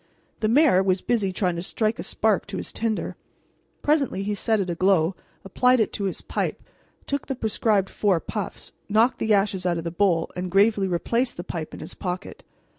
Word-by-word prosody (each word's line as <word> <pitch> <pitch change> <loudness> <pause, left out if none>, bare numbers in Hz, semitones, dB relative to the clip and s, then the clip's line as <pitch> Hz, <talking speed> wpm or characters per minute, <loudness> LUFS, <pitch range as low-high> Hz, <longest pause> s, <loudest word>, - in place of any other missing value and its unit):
The 215 - +1
mayor 255 -5 +5
was 190 -1 +2
busy 210 -6 0
trying 180 -2 -1
to - - -2
strike 215 +4 -1
a - - -3
spark 215 -3 +1
to 195 -1 -5
his - - -6
tinder. 225 -1 -2 0.7
Presently 285 -10 +1
he 210 +1 -1
set 220 +1 +1
it 195 - -1
aglow, 180 0 +2 0.3
applied 250 +6 +3
it 220 - +1
to 200 - -2
his 190 - -3
pipe, - - -3 0.4
took 280 0 -3
the 270 - -2
prescribed 215 -4 +1
four 195 -5 +2
puffs, 205 +5 -5 0.2
knocked 225 +4 +3
the 220 - 0
ashes 195 -2 0
out 175 -1 +1
of 165 - -4
the 170 - -3
bowl, 175 -2 +1
and 180 0 -3
gravely 200 +1 +3
replaced 230 +8 0
the 175 - -4
pipe 165 -3 -5
in - - -9
his - - -8
pocket. 185 0 -5
200 Hz, 195 wpm, -24 LUFS, 185-220 Hz, 0.7 s, mayor